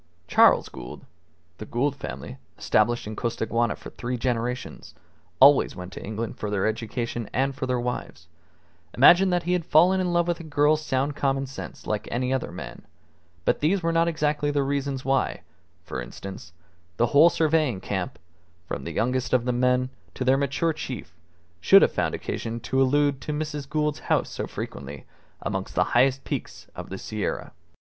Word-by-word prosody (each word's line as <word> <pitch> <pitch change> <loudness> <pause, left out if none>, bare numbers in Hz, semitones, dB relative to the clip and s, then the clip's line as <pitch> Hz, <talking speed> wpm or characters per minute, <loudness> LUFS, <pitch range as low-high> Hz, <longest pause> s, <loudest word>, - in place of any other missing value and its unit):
Charles - - +5
Gould 60 -1 -10 0.5
(the 110 - -6
Gould 135 +4 0
family, 65 - -7 0.2
established 120 +3 +1
in 110 +1 -6
Costaguana 115 -1 -1
for - - -11
three 125 0 -4
generations, 125 0 -3 0.4
always 140 +1 +6
went 90 +1 -8
to - - -8
England 110 +1 -5
for 105 - -3
their 100 -2 0
education 115 +1 -3
and 135 +1 +1
for 130 0 -4
their 125 -1 0
wives) 120 -9 -5 0.7
imagined 175 +8 +7
that 175 -1 +1
he 180 - 0
had 180 -2 0
fallen 180 +5 +4
in 180 -1 0
love 175 0 +2
with 175 -1 -1
a - - -8
girl's 150 0 +2
sound 140 0 -1
common 135 -1 0
sense 135 - -9
like 105 -1 -2
any 125 +2 -1
other 130 - -2
man, - - -8 0.6
but - - +2
these 175 +5 +1
were 165 - +1
not 165 0 +3
exactly 150 -2 0
the 145 -1 +1
reasons 140 -1 -2
why, 135 0 0 0.4
for 65 - -5
instance, 95 +8 -9 0.5
the 120 - +4
whole 155 +4 +8
surveying 155 - +1
camp, 95 -1 -4 0.5
from - - -5
the - - -4
youngest 125 +2 -1
of 125 -2 +3
the 125 - +1
young 120 - -2
men 125 0 +2 0.3
to 130 - -3
their 130 +1 +5
mature 140 +4 0
chief, 120 - -7 0.4
should - - +7
have - - +3
found - - 0
occasion 115 +1 -4
to 130 +3 0
allude 140 0 +2
to - - -4
Mrs. 150 -2 -4
Gould's 150 -1 0
house - - 0
so - - -4
frequently 70 +1 -7 0.4
amongst - - -3
the - - +4
high 125 +3 +6
peaks - - -5
of - - -7
the 95 - -5
Sierra. 105 +1 -4
130 Hz, 180 wpm, -25 LUFS, 115-150 Hz, 0.7 s, whole